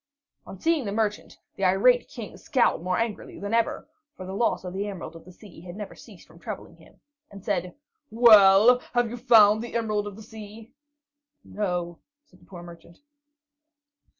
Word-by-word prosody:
On 190 - -10
seeing 325 -2 0
the 200 - -3
merchant, 210 0 -3 0.2
the 195 - -6
irate 200 +7 +3
King 230 -5 -9
scowled 255 - 0
more 180 +1 -1
angrily 230 -2 -4
than 205 +2 -5
ever, 230 -1 0 0.3
for 185 - -8
the 190 - -7
loss 230 0 0
of 180 -1 -7
the 200 +2 -3
Emerald 195 -4 -8
of 165 - -13
the 185 - -13
Sea 185 -2 -15
had 175 0 -10
never 205 -1 -8
ceased - - -16
from - - -19
troubling - - -8
him, - - -21 0.3
and 200 0 -13
said: 185 -5 -2 0.3
"Well, 220 0 +6 0.2
have 240 -2 +1
you 240 - -6
found 220 -3 +5
the 235 0 -8
Emerald 215 -3 -1
of 205 - -8
the 220 - -12
Sea?" 220 +2 -12 0.7
"No," 175 -4 -4 0.3
said 300 - -24
the - - -22
poor 175 -2 -11
merchant. 170 0 -14
205 Hz, 180 wpm, -25 LUFS, 185-230 Hz, 0.7 s, Well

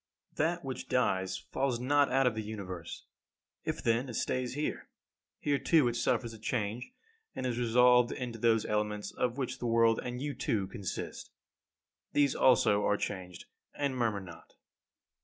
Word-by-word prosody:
18. - - +1
That - - -4
which - - -5
dies 95 0 +1
falls 130 -3 -2
not 145 +3 +3
out 135 0 +3
of 125 - +3
the 110 - -3
Universe. 95 -6 -7 0.6
If - - -3
then 115 +3 +1
it 120 - -6
stays 125 +2 -1
here, 150 +1 -3 0.5
here 145 -2 0
too 155 -7 +4
it 120 - -1
suffers 120 -1 0
a 110 - -11
change, 115 - -2 0.4
and 130 - -3
is 125 -1 -1
resolved 125 +1 +5
into 120 -3 -5
those 115 -1 +3
elements 105 -1 -1
of 125 +1 -1
which 130 -3 -3
the 120 - -2
world, 115 -1 +4
and 125 0 -4
you 145 +1 -3
too, 105 -5 -1
consist. 100 -2 -6 0.8
These 145 -2 +3
also 105 -5 +4
are 105 - +2
changed, 90 -3 -5 0.3
and 140 -2 -1
murmur 115 -5 0
not. 90 -3 -13
120 Hz, 165 wpm, -31 LUFS, 105-130 Hz, 0.8 s, resolved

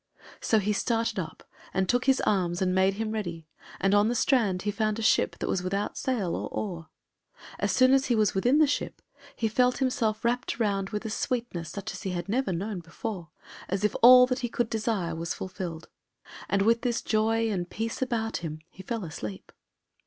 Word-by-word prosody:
So 220 - +2
he 210 0 +1
started 225 -1 0
up 160 -3 -6 0.3
and 190 -1 +1
took 245 +4 +1
his 265 0 +3
arms 175 -4 +1
and 185 -1 +1
made 190 +1 +3
him 220 +1 -3
ready, 175 -7 -4 0.3
and 195 +1 +2
on 205 +1 +5
the 240 - 0
strand 220 -8 +2
he 205 - 0
found 215 0 -1
a 225 - -3
ship - - +2
that - - -3
was 180 - 0
without 195 +3 -2
sail 220 -10 -1
or - - -4
oar. 170 -6 -5 0.7
As - - +1
soon 255 +1 +5
as 270 0 +3
he 245 - +2
was 215 -2 +2
within 245 +9 +3
the 310 - +6
ship, 290 - -3 0.3
he 225 - 0
felt 250 +3 +2
himself 235 -4 0
wrapped 245 +3 -1
round 200 -3 0
with 210 0 -4
a 220 - -3
sweetness 230 -9 -3
such 200 +1 -5
as - - -8
he 190 -3 -3
had 175 +1 -4
never 245 +1 0
known 190 +3 -3
before, 170 +1 -6 0.4
as 190 +2 -1
if 210 - +1
all 250 +1 +10
that 255 0 -2
he 240 - -2
could 235 -1 -1
desire 210 -7 -1
was 165 0 -3
fulfilled. 180 -3 -6 0.6
And 195 0 +2
with 230 +2 +3
this 240 -2 -1
joy 225 +1 +1
and 180 -3 -2
peace 225 +3 -4
about 230 -3 -1
him 155 -2 -6
he 190 - -11
fell 225 +2 -4
asleep. 105 - -7
215 Hz, 205 wpm, -27 LUFS, 185-235 Hz, 0.7 s, all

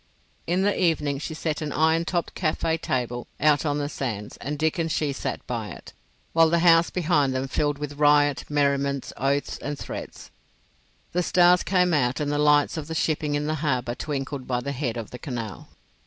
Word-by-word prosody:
In 180 +3 +1
the 205 -1 +1
evening 150 -5 +1
she 160 +2 -5
set 155 -1 -2
an 150 -1 -3
iron 160 +2 +2
topped 175 -1 -2
café 160 -1 -1
table 120 -1 -2
out 150 +1 +3
on 145 0 0
the 145 -1 -1
sands, 115 -8 -4
and 145 +2 -4
Dick 160 +2 0
and 165 -1 0
she 150 -3 0
sat - - -4
by - - -3
it, - - -11 0.4
while 165 -1 +5
the 170 - +3
house 165 0 +6
behind 150 -7 +1
them 130 +1 -1
filled 145 +1 0
with 145 0 -6
riot, 145 -3 +4
merriment, 140 -2 0
oaths, 140 +2 -1
and 145 0 -4
threats. - - -8 0.8
The 180 - +1
stars 180 0 +5
came 180 -2 +2
out 130 -4 +1
and 145 -1 -1
the 145 - 0
lights 150 +1 +3
of 150 -2 -5
the 160 - -5
shipping 150 -2 0
in 145 0 -1
the 155 - 0
harbour 125 -6 0
twinkled 135 0 -4
by 125 -1 0
the 140 - -3
head 125 -4 -3
of 115 -2 -6
the 125 - -8
Canal. 115 -8 -6
145 Hz, 200 wpm, -25 LUFS, 135-160 Hz, 0.8 s, house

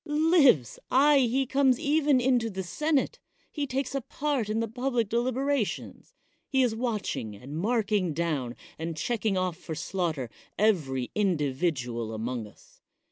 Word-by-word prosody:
Lives! 295 - +4
aye, 285 +2 +5
he 260 +1 +2
comes 265 -1 +3
even 290 -2 +3
into 245 -2 +2
the 190 -2 -4
senate. 300 - 0 0.3
He 290 -2 -2
takes 265 0 -2
a 275 - -1
part 275 -4 -2
in 215 +1 0
the 230 - 0
public 245 -1 -1
deliberations; 255 +1 -1 0.3
he 265 -2 +3
is 240 -3 +1
watching 215 - -3
and 125 +8 -10
marMng 205 -3 0
down 145 -7 -1 0.2
and 165 0 -4
checking 215 +3 0
off 185 -2 -1
for 160 -3 -6
slaughter 160 -8 -2 0.3
every 145 - +1
individual 135 - -1
among 115 0 -3
us. 105 - -21
220 Hz, 140 wpm, -28 LUFS, 160-265 Hz, 0.3 s, aye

